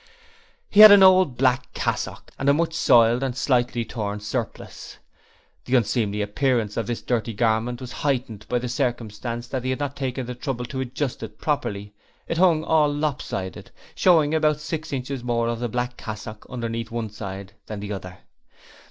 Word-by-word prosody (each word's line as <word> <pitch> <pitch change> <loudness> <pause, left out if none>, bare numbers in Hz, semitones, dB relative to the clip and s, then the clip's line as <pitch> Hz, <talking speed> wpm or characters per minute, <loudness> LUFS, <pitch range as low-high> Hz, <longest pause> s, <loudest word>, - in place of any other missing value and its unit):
He 205 - +3
had 215 0 +13
on 205 - +10
an 195 - +6
old 185 -9 +5
black 125 -1 +1
cassock - - -3
and 135 - +2
a 140 - +5
much 165 +1 0
soiled 120 -5 +4
and 130 -2 -2
slightly 120 -3 +1
torn 105 -2 -4
surplice. 110 +3 -6 0.7
The 130 - +1
unseemly 105 -3 +1
appearance 110 0 0
of 115 -3 -2
this 120 - -3
dirty 115 -1 -1
garment 115 +2 0
was 125 -2 -8
heightened 125 -7 -2
by 125 - +1
the 125 +1 -3
circumstance 120 -2 -3
that 130 -2 -3
he 130 - -2
had 130 - -1
not 145 -1 -3
taken 130 -2 -3
the 125 - -5
trouble 125 -1 -4
to 130 +2 -6
adjust 130 +1 -3
it 110 -1 -8
properly. 105 -9 -2 0.3
It 165 - -2
hung 170 -4 +4
all 155 -2 +3
lop 145 -1 -1
sided, 95 -1 -6 0.2
showing 160 -5 +4
about 155 -1 +2
six 155 0 -5
inches 130 -1 -4
more 120 -1 0
of 115 -1 -2
the 120 0 -2
black 125 +2 -3
cassock 110 0 -8
underneath 115 -2 -4
one 115 -2 -4
side 100 -1 -7
than 105 -1 -5
the 105 0 -5
other. 95 -2 -8
125 Hz, 185 wpm, -24 LUFS, 110-140 Hz, 0.7 s, had